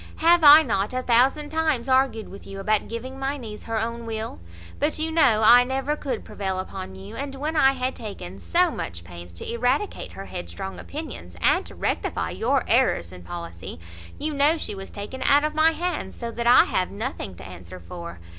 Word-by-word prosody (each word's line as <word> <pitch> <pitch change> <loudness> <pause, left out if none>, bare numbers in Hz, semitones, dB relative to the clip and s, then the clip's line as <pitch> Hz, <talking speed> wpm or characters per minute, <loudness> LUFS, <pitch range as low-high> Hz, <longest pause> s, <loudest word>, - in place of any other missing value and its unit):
Have 340 +1 +4
I 300 +2 +10
not 200 -1 -1
a 255 - -1
thousand 265 +5 +3
times 315 -6 0
argued 260 -4 +2
with 195 - -12
you 195 0 -7
about 210 +1 +1
giving 255 +4 -6
my 270 +2 -2
niece 220 -5 -9
her 225 -1 -1
own 230 +1 -4
will? 220 0 -5 0.4
But 300 +2 +1
you 320 +1 -1
know 245 -10 +4
I 245 +2 +8
never 270 +3 -1
could 265 -6 -4
prevail 190 -2 -3
upon 190 0 -6
you; 195 +3 -10
and 275 +1 -5
when 300 +4 -3
I 270 -3 +5
had 255 0 -2
taken 145 - -8
so 85 -2 +2
much 85 +1 -6
pains 85 0 -10
to 85 - -4
eradicate 250 - -1
her - - -8
headstrong 195 0 -6
opinions, 280 - -8
and - - +3
to - - -12
rectify - - -2
your - - +1
errors 85 0 +2
in 90 -1 -11
policy, 85 -1 -8 0.4
you 305 +1 -2
know 290 +3 +4
she 310 - -4
was 195 -1 -8
taken 210 +6 -7
out 285 +2 +5
of 305 - -1
my 310 +1 +5
hands; 350 +2 -3
so 235 -1 -5
that 235 +1 -3
I 245 - +8
have 185 - -1
nothing 200 - -5
to - - -11
answer 90 0 -10
for. 170 - -9
235 Hz, 200 wpm, -24 LUFS, 190-280 Hz, 0.4 s, I